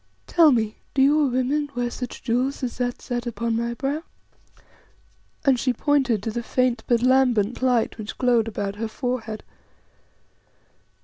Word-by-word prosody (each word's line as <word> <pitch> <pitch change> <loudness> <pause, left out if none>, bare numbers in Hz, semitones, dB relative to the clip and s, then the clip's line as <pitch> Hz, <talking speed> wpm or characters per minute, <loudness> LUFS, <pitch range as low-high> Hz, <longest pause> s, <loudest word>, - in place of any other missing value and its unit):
Tell 330 -3 +5
me, 220 -4 0 0.2
do 270 - +3
your 295 +1 +4
women 265 +4 0
wear 245 -1 -1
such 250 0 -6
jewels 255 +3 -1
as 245 -1 -4
that 245 -1 -2
set 245 -1 -3
upon 235 0 -2
my 235 +1 -2
brow?" 280 +5 -2 1.4
and 265 -3 +4
she 255 +1 +1
pointed 260 -5 +1
to 225 - -2
the 235 - -3
faint 250 0 0
but 240 -1 +2
lambent 250 -4 +3
light 245 -3 +1
which 215 0 -6
glowed 240 -3 +2
about 205 -2 -4
her 225 +1 -2
forehead. 225 -2 -4
245 Hz, 150 wpm, -24 LUFS, 230-260 Hz, 1.4 s, Tell